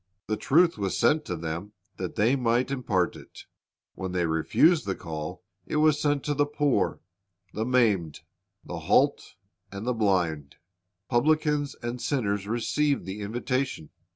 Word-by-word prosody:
The 110 - -1
truth 165 +3 +3
was 100 -2 -1
sent 150 +6 +3
to 90 - -3
them 85 +5 -5 0.2
that 90 -1 -5
they 115 +6 +3
might 125 0 +1
impart 105 -10 0
it. - - -13 0.5
When 95 -1 -5
they 90 -1 +1
refused 100 - +3
the 95 - -1
call, 80 -3 -6 0.2
it - - -3
was 150 -1 +3
sent 145 -2 +1
to 150 - 0
the 145 0 +1
poor, 145 -7 0 0.5
the 110 +2 -2
maimed, 105 - +2 0.4
the - - -5
halt, - - +2 0.4
and 100 +2 -6
the 125 - +1
blind. 90 -10 0 0.5
Publicans 150 +2 +1
and 120 +1 -4
sinners 105 -8 -1
received 140 +6 0
the 95 +2 -6
invitation. 120 - -2
115 Hz, 150 wpm, -27 LUFS, 95-140 Hz, 0.5 s, truth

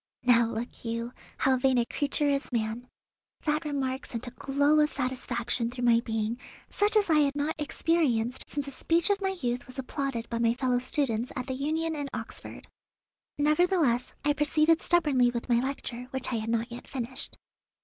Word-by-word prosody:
Now, 235 -2 +5
look 230 +1 -5
you, 230 +1 -3 0.2
how 265 -1 +3
vain 260 0 +3
a 240 - +3
creature 290 +3 0
is 280 -1 0
man. 230 +1 -2 0.6
That 305 0 0
remark 275 -2 -2
sent 235 0 -5
a 245 - -7
glow 285 +4 +2
of 300 0 +4
satisfaction 250 -3 -2
through 245 0 -5
my 230 -1 +6
being 225 0 -2 0.3
such 415 +2 +2
as 420 -2 +4
I 315 -2 +4
had 285 -1 +2
not 295 +2 0
experienced 270 -7 +1
since 285 -1 -3
a - - -5
speech 335 +7 +1
of 405 0 +1
my 385 -1 -1
youth 245 0 -1
was 255 - -9
applauded 265 -3 -3
by 230 - -3
my 230 0 +3
fellow 250 -1 +1
students 250 -3 -1
at 255 - -3
the 260 - -3
Union 315 +4 -1
in 285 -2 -3
Oxford. 225 +1 -8 0.7
Nevertheless, 300 -4 +2
I 295 - +4
proceeded 305 +2 +3
stubbornly 290 -8 +3
with 240 +1 -4
my 235 -1 +4
lecture, 250 -2 -4
which 265 -1 -3
I - - +1
had 220 +1 -3
not 230 +1 0
yet 240 - -8
finished. 255 -1 -5
260 Hz, 185 wpm, -28 LUFS, 240-295 Hz, 0.7 s, my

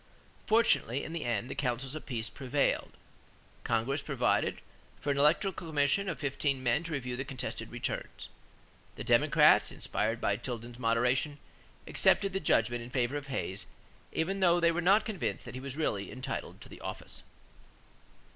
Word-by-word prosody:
Fortunately, 215 - +3
in 160 - -6
the 170 - -3
end, 120 -1 -1
the - - -5
counsels 130 0 -2
of 155 - -7
peace 115 -4 -1
prevailed. 135 +6 0 0.7
Congress 120 +6 0
provided 140 -4 +1 0.4
for 145 - -1
an 140 - 0
electoral 165 +7 +3
commission 160 +4 +1
of 165 - -3
fifteen 140 -1 -1
men 125 +6 +2
to 165 -1 -5
review 125 -3 -3
the 130 - -3
contested 130 -1 -5
returns. - - -4 0.7
The - - -6
Democrats, - - +5
inspired 115 +2 -1
by 100 -3 +1
Tilden's 120 0 -6
moderation, 125 +5 +1 0.5
accepted 195 -1 +3
the 195 - 0
judgment 120 - +2
in 120 - -8
favor 125 +1 0
of 145 -1 -4
Hayes 100 -7 -3 0.4
even 190 +5 -1
though 175 -2 +4
they 170 -1 +4
were 170 +1 -1
not 200 +5 +5
convinced 140 - -3
that - - -8
he 130 - -6
was 135 +1 -5
really 105 -11 -1
entitled 130 +1 -5
to - - -12
the - - -12
office. - - -6
135 Hz, 165 wpm, -31 LUFS, 120-160 Hz, 0.7 s, Democrats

